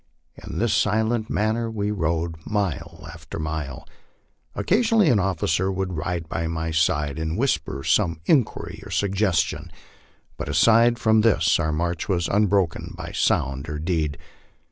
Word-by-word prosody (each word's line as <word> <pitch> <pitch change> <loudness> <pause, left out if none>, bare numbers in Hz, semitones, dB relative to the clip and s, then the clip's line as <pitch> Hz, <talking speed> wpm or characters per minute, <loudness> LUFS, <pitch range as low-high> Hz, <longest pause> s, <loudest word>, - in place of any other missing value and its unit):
In - - -8
this 115 0 +1
silent 110 +1 +1
man 105 +3 +1
ner 115 0 -2
we 105 -2 -2
rode 80 -3 -2
mile 100 -5 -3
after - - -9
mile. 80 -4 -5 0.7
Occasionally 220 -2 +3
an 115 - +4
officer 95 0 0
would 95 -1 -3
ride 85 +1 -3
by 85 +1 -3
my 80 0 -3
side 75 -2 +1
and 80 +1 -2
whisper 80 - -1
some 85 0 +1
inquiry 125 - 0
or - - -10
suggestion, 100 -3 0 0.7
but - - -5
aside 115 +10 +4
from 110 -1 +3
this 85 -9 +3
our 80 -2 0
march 85 +3 -2
was 90 -3 +1
unbro 100 -2 +3
ken - - -9
by - - -6
sound 70 +1 0
or 75 - -3
deed. 80 -2 -1
90 Hz, 150 wpm, -24 LUFS, 80-110 Hz, 0.7 s, an